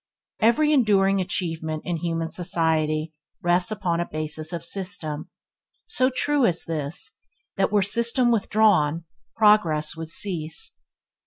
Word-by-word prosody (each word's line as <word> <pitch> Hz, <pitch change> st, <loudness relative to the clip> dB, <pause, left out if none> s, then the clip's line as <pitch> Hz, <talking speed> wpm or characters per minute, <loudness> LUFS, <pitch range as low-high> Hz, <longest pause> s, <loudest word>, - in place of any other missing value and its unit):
Every 300 Hz, +7 st, +3 dB
enduring 195 Hz, -7 st, +3 dB
achievement 160 Hz, -4 st, -2 dB
in 175 Hz, -1 st, -2 dB
human 165 Hz, 0 st, -3 dB
society 160 Hz, -3 st, 0 dB, 0.3 s
rests 175 Hz, +1 st, +2 dB
upon 175 Hz, -5 st, -1 dB
a 175 Hz, -, -3 dB
basis 155 Hz, 0 st, -3 dB
of 170 Hz, -2 st, -5 dB
system; 175 Hz, -5 st, -3 dB, 0.6 s
so 255 Hz, -11 st, +2 dB
true 290 Hz, +1 st, 0 dB
is 175 Hz, -8 st, +1 dB
this, 155 Hz, -1 st, -4 dB, 0.4 s
that 195 Hz, -1 st, +1 dB
were 205 Hz, -2 st, +3 dB
system 235 Hz, +4 st, +3 dB
withdrawn, 205 Hz, -8 st, +2 dB, 0.3 s
progress 175 Hz, -9 st, +3 dB
would 160 Hz, 0 st, -7 dB
cease. 170 Hz, -, -1 dB
175 Hz, 125 wpm, -24 LUFS, 160-210 Hz, 0.6 s, Every